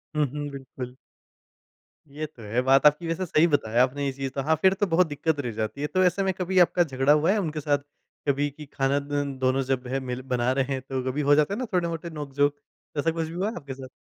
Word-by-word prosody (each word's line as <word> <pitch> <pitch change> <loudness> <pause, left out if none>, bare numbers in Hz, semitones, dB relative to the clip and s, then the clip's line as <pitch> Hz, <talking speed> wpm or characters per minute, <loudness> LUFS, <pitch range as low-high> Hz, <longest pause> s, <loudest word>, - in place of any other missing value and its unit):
हुँ, 150 -1 +3
हुँ, 145 0 -4
बिल्कुल। 130 -2 -8 1.2
ये 150 +2 -4
तो 145 -6 -13
है, 110 +4 0
बात 135 +3 +4
आपकी 150 +3 +4
वैसे 165 +3 -1
सही 160 -1 +4
बताया 125 -6 +2
आपने 140 +2 -1
ये 135 - 0
चीज़ 135 0 -4
तो, 135 - -2
हाँ 155 +4 +2
फिर 190 0 +5
तो 205 +1 0
बहुत 175 +1 +3
दिक्कत 150 0 -1
रह 125 -4 -2
जाती 110 +5 -4
है। 150 - 0
तो 185 +5 +2
ऐसे 185 +2 +2
में 190 0 +1
कभी 185 0 0
आपका 175 0 +5
झगड़ा 135 -2 +2
हुआ 155 +5 +3
है 215 - +2
उनके 160 -5 -2
साथ 145 -1 +1 0.5
कभी 145 +1 +2
कि 150 +2 -11
खाना 140 +1 +1
द 145 0 -2 0.2
दोनों 130 +1 +2
जब 130 -1 -2
हैं 135 +2 -1
मिल 125 -1 -4
बना 125 -1 0
रहे 135 0 +1
हैं, 130 - -3
तो 130 -1 -4
कभी 145 +3 -2
हो 145 0 +5
जाता 150 +6 +2
है 210 - -3
ना 255 - -1
थोड़े-मोटे 170 -1 -1
नोक-झोंक। 145 -2 0 0.4
ऐसा 165 +3 +2
कुछ 165 -1 -2
भी 160 - -8
हुआ 190 +5 -1
है - - -7
आपके 140 -5 -7
साथ? 130 0 -9
145 Hz, 255 wpm, -26 LUFS, 135-165 Hz, 1.2 s, फिर